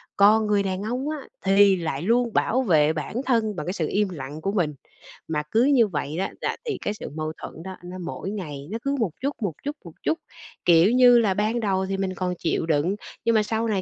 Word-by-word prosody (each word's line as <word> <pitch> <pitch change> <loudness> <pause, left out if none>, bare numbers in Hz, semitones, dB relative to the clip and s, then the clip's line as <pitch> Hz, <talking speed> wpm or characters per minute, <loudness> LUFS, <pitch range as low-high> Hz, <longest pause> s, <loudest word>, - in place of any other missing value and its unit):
Còn 210 +2 +5
người 205 -1 +2
đàn 190 0 -2
ông 250 +6 -2
á, 310 - -2 0.3
thì 195 0 +6
lại 160 -5 -3
luôn 235 +4 +2
bảo 260 +3 +2
vệ 155 -8 +3
bản 155 +6 -5
thân 225 -5 +1
bằng 150 - -4
cái 180 - -2
sự 160 -6 -1
im 205 -1 +1
lặng 150 -1 -7
của 195 - -1
mình. 170 -7 0 0.5
Mà 150 -2 -1
cứ 230 +3 +4
như 260 -6 +5
vậy 150 -2 -3
á 195 - -1
là - - -1
thì 440 - -2
cái 205 - -1
sự - - -7
mâu 155 0 -3
thuẫn 165 - -8
đó 190 0 -7
nó 180 +1 -7
mỗi 195 - -5
ngày 150 -8 -6
nó 225 - -2
cứ 280 0 0
một 205 -8 0
chút, 280 +1 -1
một 190 -7 -1
chút, 290 +1 -3
một 170 - -9
chút. 320 - 0 0.5
Kiểu 170 +5 +6
như 245 -1 +7
là 205 -4 +2
ban 215 +4 0
đầu 190 -3 0
thì 195 0 -2
mình 190 -1 -1
còn 180 0 -1
chịu 165 -1 0
đựng, 165 +5 +1 0.3
nhưng 230 -1 +3
mà 215 - +4
sau 225 +1 -1
này 200 -4 0
195 Hz, 245 wpm, -24 LUFS, 165-225 Hz, 0.5 s, như